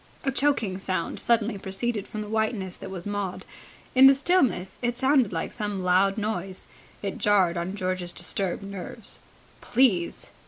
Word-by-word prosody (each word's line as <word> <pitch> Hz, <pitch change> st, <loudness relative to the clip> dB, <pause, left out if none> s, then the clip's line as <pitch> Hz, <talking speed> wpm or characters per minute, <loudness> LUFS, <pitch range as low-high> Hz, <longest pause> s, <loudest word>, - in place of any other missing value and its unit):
A 270 Hz, -, +1 dB
choking 250 Hz, -9 st, +1 dB
sound 185 Hz, -3 st, -2 dB
suddenly 230 Hz, -3 st, +1 dB
proceeded 200 Hz, +2 st, -2 dB
from 215 Hz, -, -5 dB
the 210 Hz, -, -5 dB
whiteness 215 Hz, -4 st, -1 dB
that -, -, -8 dB
was 185 Hz, -2 st, -7 dB
Maud. 205 Hz, -3 st, -3 dB, 0.5 s
In 260 Hz, +1 st, +9 dB
the 270 Hz, -, +7 dB
stillness 265 Hz, -, +1 dB
it 240 Hz, -1 st, -1 dB
sounded 265 Hz, -4 st, +3 dB
like 165 Hz, -2 st, -3 dB
some 205 Hz, -4 st, -3 dB
loud 190 Hz, +3 st, +3 dB
noise. 195 Hz, -3 st, -3 dB, 0.4 s
It 195 Hz, -, -3 dB
jarred 190 Hz, -4 st, +3 dB
on 175 Hz, +3 st, -3 dB
George's 185 Hz, -2 st, -2 dB
disturbed 185 Hz, +2 st, -2 dB
nerves. 200 Hz, +2 st, -7 dB, 0.4 s
"Please!" 210 Hz, -10 st, +1 dB
200 Hz, 155 wpm, -26 LUFS, 185-235 Hz, 0.5 s, In